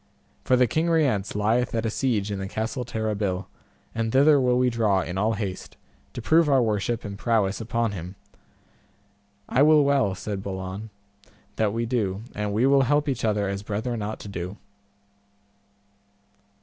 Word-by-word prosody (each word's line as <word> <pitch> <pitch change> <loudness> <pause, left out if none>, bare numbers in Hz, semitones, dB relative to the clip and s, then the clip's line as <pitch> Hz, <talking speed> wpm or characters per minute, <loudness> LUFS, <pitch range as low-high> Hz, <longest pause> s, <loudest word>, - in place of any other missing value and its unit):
For 130 - +3
the 125 0 +4
King 160 +7 0
Rience 135 - +1
lieth 115 +4 +1
at 115 - -1
a 110 - 0
siege 110 -5 -1
at 100 - -3
the 95 - -4
Castle 110 +5 -3
Terrabil, 105 -5 -2 0.5
and 115 0 -2
thither 140 +2 +5
will 125 -1 +2
we 125 0 +2
draw 105 -5 +2
in 90 - -5
all 105 +4 +1
haste, 100 -3 -5 0.4
to 120 - -6
prove 160 +2 +4
our 135 -2 +5
worship 110 +1 -1
and 100 -1 -7
prowess 105 -3 +1
upon 115 0 -1
him. 90 0 -7 1.3
I 130 - +2
will 150 0 +6
well, 135 -9 +2
said 100 0 -5
Balan, 95 +2 -6 0.7
that 110 -2 +1
we 115 +2 -2
do, 110 -4 -1
and 105 0 -3
we 110 +5 +2
will 135 0 +5
help 145 +3 +2
each 135 -4 -2
other 105 -2 +1
as 100 0 -3
brethren 110 +3 -3
ought 105 +1 -4
to - - -8
do. 90 0 -6
110 Hz, 170 wpm, -25 LUFS, 100-125 Hz, 1.3 s, will